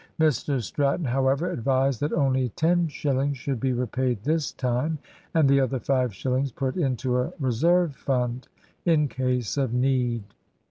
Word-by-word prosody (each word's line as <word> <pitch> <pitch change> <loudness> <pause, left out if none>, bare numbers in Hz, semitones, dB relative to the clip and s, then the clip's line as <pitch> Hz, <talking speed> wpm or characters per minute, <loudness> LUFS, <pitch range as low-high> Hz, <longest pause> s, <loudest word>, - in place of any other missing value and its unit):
Mr 145 -3 +2
Stratton, 145 +7 0
however, 135 +6 +1
advised 135 -3 +1
that 145 - -1
only 130 -2 +1
ten 175 +1 +2
shillings 140 -2 -1
should 130 0 -3
be 130 +1 0
repaid 125 -2 -1
this 155 +2 0
time, 130 +5 -1 0.4
and 160 -3 +5
the 140 0 +5
other 130 -1 0
five 130 -1 +1
shillings 130 +6 -1
put 130 +2 -2
into 130 -5 0
a 125 +7 -1
reserve 155 +5 +2
fund, 125 -2 -2 0.4
in 155 -4 +3
case 125 -3 -1
of 130 -4 0
need. 125 -3 +1
135 Hz, 150 wpm, -25 LUFS, 125-145 Hz, 0.4 s, and